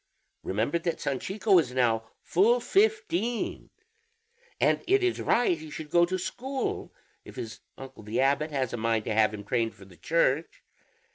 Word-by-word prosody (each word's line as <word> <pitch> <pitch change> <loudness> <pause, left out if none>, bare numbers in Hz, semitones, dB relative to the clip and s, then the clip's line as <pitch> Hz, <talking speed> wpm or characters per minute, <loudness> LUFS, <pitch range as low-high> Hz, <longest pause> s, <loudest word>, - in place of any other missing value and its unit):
Remember 110 - -1
that 170 0 -2
Sanchico 190 - +2
is 130 -6 -2
now 115 -3 +1
full 225 +7 +3
fifteen, 385 - 0 0.9
and - - +2
it 390 +1 +3
is 370 -1 0
right 235 -7 +2
he 155 0 -9
should 150 0 -8
go 175 0 +5
to 185 +1 -1
school, 260 +8 -4 0.3
if - - -12
his 110 -1 -7 0.2
uncle 135 -3 -10
the 110 +3 -3
abbot 140 +3 +2
has 135 -5 -2
a - - -2
mind 115 -1 0
to - - -1
have 110 0 +4
him 105 -1 -7
trained 115 +1 -1
for 95 - -14
the 90 -2 -17
Church. 160 - 0
150 Hz, 165 wpm, -28 LUFS, -, 0.9 s, go